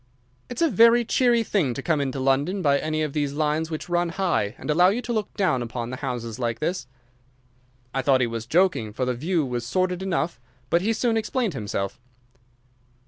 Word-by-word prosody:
"It's 245 +6 -1
a - - +5
very 235 +1 +6
cheery 240 0 +3
thing 165 - 0
to 135 - -5
come 160 -4 +1
into 135 -1 -2
London 140 +9 +1
by 140 -2 +3
any 155 0 -1
of 150 -2 -3
these 145 -2 -1
lines 155 +2 0
which 155 -2 -5
run 175 0 +1
high, 165 - -1
and - - -3
allow 175 +4 +5
you 210 +5 0
to 245 -1 -3
look 215 -2 -2
down 180 -11 +2
upon 120 0 -4
the 130 - -5
houses 125 -4 -4
like 115 -2 -1
this." 170 -3 -2 1.1
I 135 - 0
thought 135 -1 +3
he - - +3
was 115 -1 -5
joking, 160 - +2
for 130 - -1
the 125 - 0
view 160 +5 0
was 120 -2 -3
sordid 180 +8 -1
enough, 175 -5 -1 0.3
but 170 - +4
he 215 +4 +1
soon 225 +1 +1
explained 225 -2 -1
himself. 100 -3 -4
155 Hz, 200 wpm, -24 LUFS, 130-190 Hz, 1.1 s, very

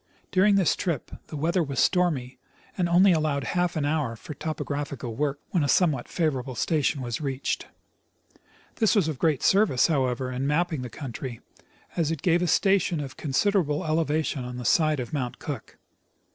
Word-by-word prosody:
During 200 +2 +4
this 190 -4 +3
trip 165 -8 -3 0.2
the 155 - -6
weather 170 +4 +1
Avas 140 -3 -5
stormy, 155 -9 +1 0.4
and 175 -2 0
only 185 +3 +6
alloAved 155 -3 0
half 175 +6 0
an 150 -2 0
hour 145 -6 0
for 150 - -9
topographical 145 -5 -4
Avork 145 +1 0 0.2
AA'hen 175 - +3
a - - +1
somcAvhat 145 -4 +2
favorable 135 -6 -1
station 145 +1 0
Avas 120 +1 -3
reached. 135 -2 -2 1.1
This 220 -1 +3
Avas 195 -7 +3
of 155 -5 -3
great 155 -5 +1
service, 190 - +4
hoAvever, 130 -3 0
in 135 +2 -1
mapping 160 -1 0
the 125 - -5
country, 125 -2 -6 0.6
as 165 -3 +1
it 160 -3 -3
gave 175 -1 +3
a 180 - +1
station 190 -1 +2
of 135 -3 -6
considerable 155 +1 +1
elevation 155 -3 0
on 125 0 -6
the 125 - -6
side 155 0 +3
of 125 +2 -5
Mount 130 -5 -2
Cook. - - -7
150 Hz, 175 wpm, -26 LUFS, 130-170 Hz, 1.1 s, only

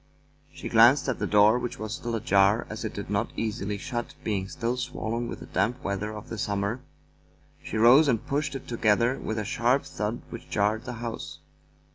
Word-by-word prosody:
She 135 -1 -7
glanced 120 +6 +6
at 135 - -1
the - - -1
door, 105 +3 +5
which 120 -1 -4
was 110 0 -5
still 120 -1 -3
ajar, 105 -1 +3
as 110 - -5
it 110 - -3
did 100 - -5
not 105 +3 0
easily 105 -2 -2
shut, 120 +2 -5
being 100 -3 -1
still 120 +2 -2
swollen 120 -2 -3
with - - -7
the - - -7
damp 110 +7 -1
weather 100 +2 -2
of 105 0 -8
the 115 - -6
summer. 100 +5 -1 0.8
She 110 - -4
rose 125 +7 +7
and 115 -5 +1
pushed 140 0 -1
it 135 - -7
together 115 +2 +2
with 110 - -3
a 105 - -2
sharp 125 +3 +2
thud 110 +3 -4
which 115 - -9
jarred 105 +3 0
the 125 - -5
house. 115 -1 -6
115 Hz, 195 wpm, -27 LUFS, 105-125 Hz, 0.8 s, rose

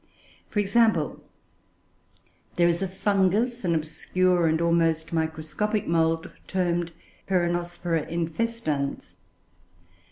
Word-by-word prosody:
For - - -6
example, 205 -6 +2 1.3
there 170 -1 +4
is 170 +1 +1
a 195 - 0
Fungus, 205 +5 +1
an 170 -2 +1
obscure 175 +3 +1
and 160 0 +2
almost 165 -1 +1
microscopic 160 +6 -1
mould, 165 -1 +1 0.2
termed 175 -2 0 0.4
Peronospora 175 -2 0
infestans. 165 -4 -2
175 Hz, 90 wpm, -26 LUFS, 160-190 Hz, 1.3 s, there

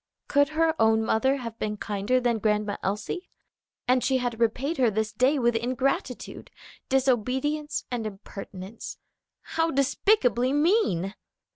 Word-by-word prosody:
Could 285 -1 +3
her 325 0 +4
own 220 0 +4
mother 265 +5 +2
have 230 -3 -7
been 210 0 -2
kinder 205 +5 0
than 240 -2 +1
Grandma 210 -1 0
Elsie? 210 - -3 0.6
and 255 0 +3
she 265 -1 +2
had 245 -2 -2
repaid 255 +8 0
her 250 -3 +4
this 215 0 -1
day 265 +4 +3
with 240 -2 +2
ingratitude, 255 +2 -2 0.4
disobedience 265 +3 0
and 235 -3 -2
impertinence. 195 0 -8 0.4
How 325 0 -1
despicably 270 - +2
mean! 290 - +2
245 Hz, 130 wpm, -26 LUFS, 220-275 Hz, 0.6 s, her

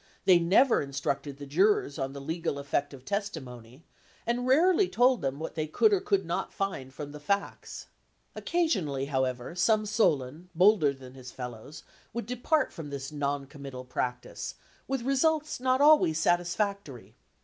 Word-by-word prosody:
They 180 -2 +7
never 205 +10 +4
instructed 140 0 -3
the 145 - -8
jurors 160 0 +2
on 135 0 -3
the 140 - -7
legal 160 +1 -3
effect 140 0 -1
of 135 -2 -12
testi 200 -3 -2
mony, 125 +1 -12 0.4
and 245 +2 -1
rarely 360 +7 +4
told 250 +1 +3
them 135 0 -2
what 160 - -5
they 155 -1 -2
could 420 - +3
or 400 - +3
could 395 -1 +1
not - - -3
find 185 -10 -4
from 145 +1 -7
the 150 - -9
facts. 200 +7 -3 0.5
Occasionally, 190 - 0
however, 130 -1 -2
some 215 +4 +2
Solon, 165 - 0
bolder 180 -4 +5
than 130 -2 -12
his 130 -2 -10
fellows, 125 +3 -8
67 - - -29
LINCOLN - - -27
THE - - -29
LAWYER - - -38
would 235 -2 -3 0.4
depart - - -19
from 155 -3 -7
this 140 -1 -6
noncommittal 140 -2 -4
practice, 125 0 -4 0.3
with 265 -3 -2
results 305 +3 +1
not 255 +1 +2
always 295 - +5
satisfactory. 175 - -1
155 Hz, 170 wpm, -29 LUFS, 135-215 Hz, 0.5 s, They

